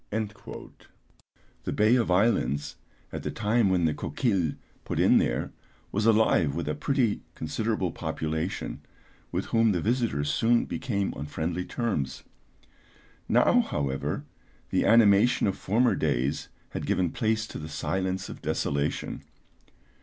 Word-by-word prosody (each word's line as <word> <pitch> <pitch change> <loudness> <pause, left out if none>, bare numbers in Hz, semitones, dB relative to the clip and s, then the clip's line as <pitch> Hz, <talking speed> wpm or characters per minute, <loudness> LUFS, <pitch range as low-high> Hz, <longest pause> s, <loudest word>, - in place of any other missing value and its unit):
The 110 0 -9
Bay 110 +3 +4
of 120 -6 +1
Islands, 90 - +1 0.4
at - - -5
the - - -3
time 110 0 +2
when 90 -3 +2
the 80 - +2
Coquille 95 - 0 0.3
put - - -3
in - - +6
there, - - -1 0.4
was 105 +2 +1
alive 110 -10 +4
with 85 -2 -3
a 75 - 0
pretty 120 - 0
considerable 95 +3 -1
population, 80 +2 -3 0.5
with - - -2
whom 115 -2 +3
the 90 - 0
visitors 105 - 0
soon 115 +7 +3
became 100 -7 -2
on 75 - -6
friendly 85 +4 -3
terms. 110 - -2 1.1
Now, - - +5
however, 70 -2 -2 0.5
the - - +2
animation 115 0 +5
of 100 - +1
former 115 +5 +2
days 65 +5 -1 0.2
had - - -5
given 90 -3 +1
place 110 -1 0
to - - -8
the 75 +1 -7
silence 95 +3 -2
of - - -9
desolation. 70 +1 -2
95 Hz, 130 wpm, -27 LUFS, 80-110 Hz, 1.1 s, in